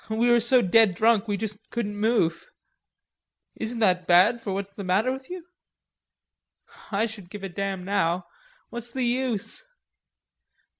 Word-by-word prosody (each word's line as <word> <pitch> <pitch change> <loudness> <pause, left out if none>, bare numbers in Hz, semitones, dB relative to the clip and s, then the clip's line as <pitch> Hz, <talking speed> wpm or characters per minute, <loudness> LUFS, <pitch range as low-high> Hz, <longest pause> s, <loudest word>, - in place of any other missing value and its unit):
We 230 +2 +2
were 240 - +5
so 240 +2 +4
dead 205 0 +4
drunk 225 +1 +3
we 205 -1 -1
just 210 0 -4
couldn't 210 -4 -3
move." 205 -6 0 1.1
"Isn't 230 +2 -4
that 180 -4 +2
bad 190 +7 +5
for 205 - -4
what's 200 +1 -4
the 200 - -7
matter 195 +7 +1
with 265 0 -7
you?" 360 -2 -7 1.5
"I 205 +2 +1
don't 210 -6 -9
give 205 0 -9
a 195 - -4
damn 195 0 -4
now; 185 -3 0 0.5
what's 240 0 -5
the 255 +1 -3
use?" 240 -3 -2
210 Hz, 150 wpm, -25 LUFS, 195-235 Hz, 1.5 s, were